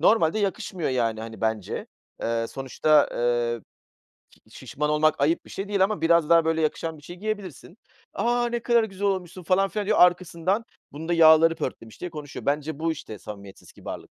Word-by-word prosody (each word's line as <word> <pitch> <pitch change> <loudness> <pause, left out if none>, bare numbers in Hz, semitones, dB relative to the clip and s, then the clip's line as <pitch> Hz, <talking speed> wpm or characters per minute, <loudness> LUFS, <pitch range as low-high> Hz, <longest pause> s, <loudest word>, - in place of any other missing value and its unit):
Normalde 210 -3 +3
yakışmıyor, 190 -5 -2
yani, 115 -3 0
hani, 110 0 -8
bence. 110 -3 -2 0.4
Eee, 115 0 -1
sonuçta, 140 +3 +2
eee, 120 -1 0 0.7
ki - - -28 0.2
şişman 150 +2 -3
olmak 155 0 +2
ayıp 155 +4 +1
bir - - -15
şey 195 +1 -5
değil 200 -2 +3
ama 210 +1 -2
biraz 170 -1 +3
daha 170 -1 +5
böyle 160 0 +1
yakışan 160 +1 -2
bir 145 - -17
şeyi 175 +3 -10
giyebilirsin. 205 -5 -6 0.4
"A! 240 +1 +1
Ne 235 0 -2
kadar 235 -1 +3
güzel 200 -1 -4
olmuşsun 185 -2 -2
falan 190 +3 +2
filan." 210 -1 -3
diyor 215 - +2
arkasından 180 +3 +2 0.3
"Bunun 160 +3 -7
da - - +1
yağları 165 0 +6
pörtlemiş." 115 -3 -6
diye 180 - -5
konuşuyor. 150 -3 -8
Bence 150 +1 -1
bu 165 +1 0
işte 110 -9 -9
samimiyetsiz 100 -2 -11
kibarlık. - - -9
165 Hz, 185 wpm, -25 LUFS, 140-190 Hz, 0.7 s, yağları